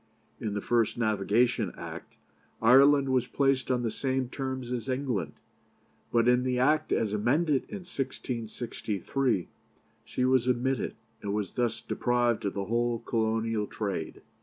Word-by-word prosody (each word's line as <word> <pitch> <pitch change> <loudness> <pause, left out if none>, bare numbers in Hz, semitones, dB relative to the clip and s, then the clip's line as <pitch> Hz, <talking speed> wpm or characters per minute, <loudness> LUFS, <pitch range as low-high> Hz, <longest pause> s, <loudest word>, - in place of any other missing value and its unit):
In 105 -3 -3
the 105 - -1
first 115 0 +1
Navigation 110 +1 +2
Act, - - -8 0.4
Ireland 135 +4 +6
was 130 -2 +2
placed 135 0 +1
on 125 -1 +1
the 115 - 0
same 130 +1 -1
terms 130 -2 -4
as 120 -1 -3
England; 125 - -1 0.8
but 115 0 +3
in 125 0 +5
the 125 0 0
Act 150 +5 +2
as 105 -2 +1
amended 135 +7 +2
in 195 -3 -7
1663 120 - -2 0.6
she 125 - -1
was 130 -1 +3
omitted, 125 0 0 0.3
and 100 0 -2
was 105 -4 -3
thus 120 -2 -1
deprived 120 -3 0
of 100 - -2
the 100 -1 -2
whole 120 +2 0
Colonial 110 -2 -1
trade. 95 -7 -4
120 Hz, 140 wpm, -29 LUFS, 110-130 Hz, 0.8 s, Ireland